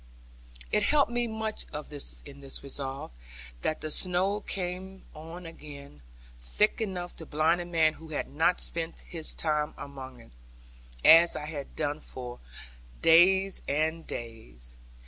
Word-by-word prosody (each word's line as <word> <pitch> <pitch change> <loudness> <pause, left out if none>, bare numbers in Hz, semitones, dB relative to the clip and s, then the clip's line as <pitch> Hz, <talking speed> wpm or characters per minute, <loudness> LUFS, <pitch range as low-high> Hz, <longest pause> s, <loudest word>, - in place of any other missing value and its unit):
It 210 - +3
helped 280 +3 +3
me 240 0 +1
much 220 -1 -4 0.6
in 140 -1 -11
this 135 -1 -1
resolve, 135 - -5 0.5
that 155 - -1
the 155 - -3
snow 185 +5 +3
came 190 0 -5
on 165 +3 -9
again, 145 - -11 0.4
thick 210 - +1
enough 180 -4 -3
to 160 - -8
blind 160 +3 +2
a - - -5
man 160 -2 +3
who 160 +1 -12
had 150 - -2
not 160 +5 +2
spent 165 0 -2
his 165 -2 -1
time 150 -2 0
among 135 -3 -8
it, 115 - -16 0.7
as 165 +1 +9
I 150 - -4
had 150 -3 -6
done 150 -1 -1
now - - -17
for 125 -1 -8 0.6
days 190 +4 +6
and 160 +3 0
days. 60 - -7
160 Hz, 145 wpm, -29 LUFS, 140-180 Hz, 0.7 s, as